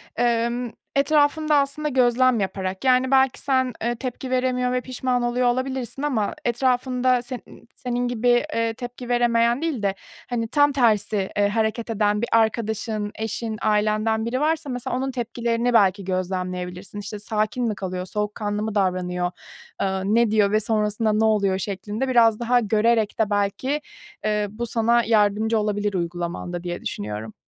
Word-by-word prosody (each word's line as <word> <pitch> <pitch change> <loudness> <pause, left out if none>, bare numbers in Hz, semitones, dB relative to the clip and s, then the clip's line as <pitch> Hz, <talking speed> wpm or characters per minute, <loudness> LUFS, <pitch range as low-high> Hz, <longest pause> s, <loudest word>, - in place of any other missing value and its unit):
Emm, 235 +1 0 0.3
etrafında 300 +2 +3
aslında 285 +2 +1
gözlem 255 -2 +3
yaparak 190 0 -3
yani 255 0 +3
belki 265 -1 +3
sen, 260 -2 +1
eee, 240 +1 0
tepki 255 +1 -5
veremiyor 250 -1 +1
ve 250 0 0
pişman 255 -1 -1
oluyor 245 +1 +1
olabilirsin. 255 +1 -2
Ama 250 -9 0
etrafında 250 +1 +1
senin 245 0 -10
senin 245 0 -2
gibi, 245 0 -1 0.3
eee, 230 0 0
tepki 245 +1 -8
veremeyen 240 +1 +2
değil 310 -10 -2
de 195 -1 +1 0.3
hani 235 -2 -1
tam 290 +4 +3
tersi, 215 -6 +1
eee, 205 0 +4
hareket 220 +2 -1
eden 210 -1 +1
bir 235 - -2
arkadaşın 220 -1 0
eşin 220 0 -3
ailenden 215 +1 +1
biri 245 +3 -1
varsa 315 -1 0
mesela 250 0 -3
onun 265 +1 -2
tepkilerini 235 0 -1
belki 200 -3 +4
gözlemleyebilirsin. 185 +1 -4
İşte, 205 +1 -6
sakin 215 +3 -1
mi 215 - -1
kalıyor? 185 -2 -4
Soğukkanlı 210 +1 -3
mı 220 -1 -3
davranıyor? 180 -2 0 0.5
Iıı, 190 -1 -1
ne 235 -2 +3
diyor 210 -2 +3
ve 215 - +3
sonrasında 215 0 0
ne 215 +1 +2
oluyor 200 -3 +2
şeklinde 205 +5 -3
biraz 230 -4 +4
daha 245 +1 +3
görerek 220 0 +1
de 220 -2 +2
belki, 205 +8 0 0.4
eee, 210 -1 +1
bu 235 +4 -5
sana 235 +1 +2
yardımcı 220 0 +2
olabilir 205 -1 -1
uygulamanda 175 0 -3
diye 175 -1 -4
düşünüyorum. 105 +1 -5
225 Hz, 155 wpm, -23 LUFS, 205-250 Hz, 0.5 s, eee